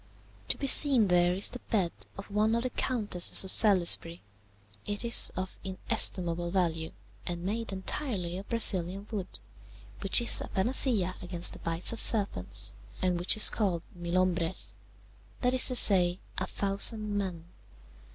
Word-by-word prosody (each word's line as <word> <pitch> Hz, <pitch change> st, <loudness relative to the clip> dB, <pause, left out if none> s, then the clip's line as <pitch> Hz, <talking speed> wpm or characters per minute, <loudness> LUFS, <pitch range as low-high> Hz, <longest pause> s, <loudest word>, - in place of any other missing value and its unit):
To -, -, -3 dB
be 280 Hz, -, -6 dB
seen 265 Hz, -6 st, +6 dB
there 175 Hz, 0 st, 0 dB
is 195 Hz, -, +1 dB
the 250 Hz, -, -8 dB
bed 190 Hz, -6 st, -2 dB, 0.3 s
of 195 Hz, +1 st, -12 dB
one 215 Hz, +2 st, -1 dB
of 235 Hz, -, -4 dB
the 255 Hz, -, -4 dB
Countesses 210 Hz, -12 st, +2 dB
of 190 Hz, -, 0 dB
Salisbury: 175 Hz, -5 st, 0 dB, 0.6 s
it 205 Hz, +3 st, -5 dB
is 235 Hz, -, +6 dB
of 185 Hz, 0 st, -8 dB
inestimable 175 Hz, -2 st, -1 dB
value 165 Hz, -3 st, -4 dB, 0.4 s
and 175 Hz, -1 st, -6 dB
made 220 Hz, +3 st, -6 dB
entirely 190 Hz, -, -6 dB
of 195 Hz, -, -15 dB
Brazilian 195 Hz, -4 st, +3 dB
wood, 195 Hz, -4 st, -7 dB, 0.6 s
which 195 Hz, +3 st, +1 dB
is 235 Hz, -, +7 dB
a -, -, -8 dB
panacea 205 Hz, -3 st, -1 dB
against 175 Hz, -1 st, -3 dB
the -, -, -14 dB
bites 165 Hz, +5 st, -3 dB
of 230 Hz, -, -8 dB
serpents, 200 Hz, -, -1 dB, 0.3 s
and 180 Hz, -2 st, -3 dB
which 180 Hz, +5 st, +2 dB
is 215 Hz, -, +6 dB
called 185 Hz, -6 st, -4 dB
milhombres 175 Hz, 0 st, -3 dB, 0.7 s
that 250 Hz, 0 st, -1 dB
is 255 Hz, -, +7 dB
to 255 Hz, -, +3 dB
say, 180 Hz, -5 st, +5 dB, 0.2 s
a 185 Hz, -, -5 dB
thousand 205 Hz, +2 st, 0 dB
men. 185 Hz, -5 st, -6 dB
190 Hz, 150 wpm, -26 LUFS, 175-220 Hz, 0.7 s, is